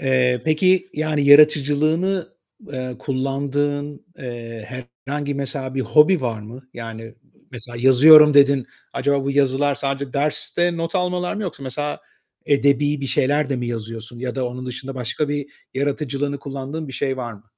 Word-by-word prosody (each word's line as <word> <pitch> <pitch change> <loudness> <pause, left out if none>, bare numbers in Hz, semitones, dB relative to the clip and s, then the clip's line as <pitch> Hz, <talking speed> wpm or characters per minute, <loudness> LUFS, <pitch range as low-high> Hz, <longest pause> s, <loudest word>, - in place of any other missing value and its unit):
Eee, 130 -2 +1
peki 185 +4 +2
yani 150 -1 0
yaratıcılığını, 155 +5 +4 0.4
eee, 130 -2 -5
kullandığın, 145 +2 -2
eee, 115 -3 -8 0.4
herhangi 145 0 -3
mesela 135 -1 -4
bir 135 - -1
hobi 155 +6 +4
var 115 -4 -3
mı? 125 +5 -12
Yani, 115 -1 -8 0.4
mesela, 120 -1 -8
"Yazıyorum." 150 +4 +8
dedin. 140 -2 +5 0.3
Acaba 140 0 0
bu 140 - -1
yazılar 140 0 +2
sadece 135 -1 -3
derste 160 +4 0
not 165 0 -4
almalar 180 -1 -1
mı 210 - -4
yoksa 175 -7 -6
mesela 145 +3 -4 0.5
edebî 145 +1 +2
bir 135 - -3
şeyler 145 +2 +1
de 135 - 0
mi 125 -1 -3
yazıyorsun? 115 0 -6
Ya 125 0 -4
da 130 -2 -1
onun 125 +1 -7
dışında 130 +2 -6
başka 130 +4 -3
bir 145 -1 -2 0.3
yaratıcılığını 140 0 -2
kullandığın 140 +3 -6
bir - - -8
şey 130 +1 -2
var 120 -2 -5
mı? 105 0 -15
140 Hz, 155 wpm, -21 LUFS, 130-150 Hz, 0.5 s, Yazıyorum